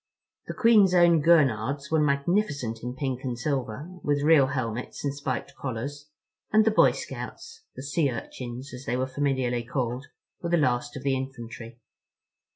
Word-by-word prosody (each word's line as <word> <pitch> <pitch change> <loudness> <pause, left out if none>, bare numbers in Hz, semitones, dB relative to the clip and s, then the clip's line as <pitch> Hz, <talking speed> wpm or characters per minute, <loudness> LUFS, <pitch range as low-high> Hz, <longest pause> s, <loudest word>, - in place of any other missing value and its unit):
The - - -5
Queen's 210 -6 +5
Own 170 -2 +5
Gurnards 140 -3 +2
were 160 - +3
magnificent 140 - 0
in 125 +1 -5
pink 130 -2 -3
and 125 -3 -3
silver, 135 0 -3
with 145 -1 0
real 150 -3 +6
helmets 125 -3 -4
and 140 - 0
spiked 140 -2 -4
collars; 140 +4 -5 0.4
and 215 0 +5
the 220 - +4
Boy 215 - +5
Scouts—"The 450 - -8
Sea 145 +1 +1
Urchins" 125 +2 -7
as 125 +2 -9
they 120 - -1
were 130 - 0
familiarly 130 -3 -1
called—were 130 +6 -5
the 175 - +3
last 120 -4 0
of 130 - -8
the 135 -1 +1
infantry. 120 -3 -7
135 Hz, 155 wpm, -26 LUFS, 125-150 Hz, 0.4 s, real